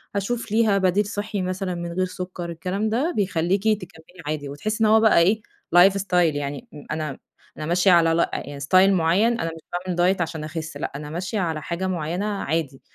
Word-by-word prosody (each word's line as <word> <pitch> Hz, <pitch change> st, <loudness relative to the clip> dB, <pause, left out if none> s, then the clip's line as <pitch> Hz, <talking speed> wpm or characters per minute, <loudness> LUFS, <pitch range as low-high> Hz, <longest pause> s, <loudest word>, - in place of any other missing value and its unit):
هاشوف 220 Hz, +3 st, -2 dB
ليها 215 Hz, -2 st, +3 dB
بديل 190 Hz, +2 st, +2 dB
صحي 205 Hz, 0 st, -3 dB
مثلًا 185 Hz, 0 st, -2 dB
من 170 Hz, 0 st, -5 dB
غير 185 Hz, +1 st, +1 dB
سكر 180 Hz, -1 st, -6 dB
الكلام 185 Hz, +6 st, -2 dB
ده، 270 Hz, +11 st, 0 dB
بيخلّيكي 195 Hz, +2 st, +1 dB
تكمّلي 180 Hz, -2 st, -13 dB
عادي، 150 Hz, -2 st, -3 dB
وتحسّي 215 Hz, +11 st, -2 dB
إن 215 Hz, -, +4 dB
هو 220 Hz, +1 st, +6 dB
بقى 220 Hz, -5 st, +5 dB
إيه 200 Hz, +6 st, +3 dB, 0.3 s
life 185 Hz, +2 st, +8 dB
style 195 Hz, -1 st, -5 dB, 0.2 s
يعني 145 Hz, -1 st, -4 dB
م 150 Hz, -1 st, -11 dB
أنا 155 Hz, -3 st, -3 dB, 0.4 s
أنا 155 Hz, -, -4 dB
ماشية 175 Hz, +4 st, +3 dB
على 165 Hz, -2 st, +5 dB
لا 170 Hz, -, +1 dB
يعني 140 Hz, 0 st, -5 dB
ستايل 185 Hz, +7 st, +4 dB
معين 190 Hz, +7 st, +2 dB
أنا 165 Hz, 0 st, -2 dB
مش 165 Hz, -, -12 dB
باعمل 180 Hz, 0 st, -3 dB
دايت 180 Hz, +2 st, +2 dB
عشان 160 Hz, -2 st, -3 dB
أخِس 160 Hz, +1 st, -6 dB
لأ. -, -, -4 dB
أنا 150 Hz, +1 st, -6 dB
ماشية 185 Hz, +6 st, -3 dB
على 165 Hz, -4 st, -1 dB
حاجة 175 Hz, +4 st, -3 dB
معينة 175 Hz, +2 st, -2 dB
عادي، 165 Hz, -9 st, -2 dB
180 Hz, 200 wpm, -23 LUFS, 165-200 Hz, 0.4 s, life